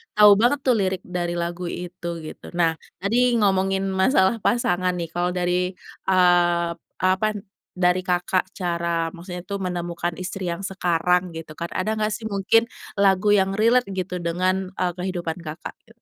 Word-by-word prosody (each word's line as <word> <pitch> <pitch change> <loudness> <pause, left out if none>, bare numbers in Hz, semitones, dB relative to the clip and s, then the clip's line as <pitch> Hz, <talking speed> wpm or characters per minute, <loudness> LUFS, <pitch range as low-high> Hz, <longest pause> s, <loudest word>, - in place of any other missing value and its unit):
tahu 210 -1 +8
banget 245 +5 +3
tuh 255 -2 +3
lirik 190 -1 -1
dari 175 -1 -3
lagu 175 +1 -3
itu 175 0 -6 0.2
gitu. 155 - -9
Nah 170 -2 +3 0.3
tadi 240 +6 +2
ngomongin 195 -1 +2
masalah 190 +2 +3
pasangan 185 -6 +1
nih, 170 -2 -4
kalau 175 +1 0
dari, 180 +1 0 0.3
eee, 175 -2 +4 0.3
apa, 190 +3 +3 0.5
dari 180 0 +3
Kakak 180 +1 +1
cara 170 -2 -1
maksudnya 180 0 -8
itu 200 - -5
menemukan 175 -2 -3
istri 185 0 -5
yang 170 +3 -3
sekarang 180 -2 0
gitu 165 -1 -8
kan, 170 - -2
ada 185 +4 0
gak 215 - +2
sih 225 - -9
mungkin 220 +2 +2 0.3
lagu 200 0 +3
yang 190 -1 +2
relate 230 -1 +3
gitu 185 -1 -3
dengan, 185 +2 0
eee, 180 -1 +1
kehidupan 180 -3 -3
Kakak? 155 0 -7
E 225 - -22
180 Hz, 155 wpm, -23 LUFS, 175-195 Hz, 0.5 s, tahu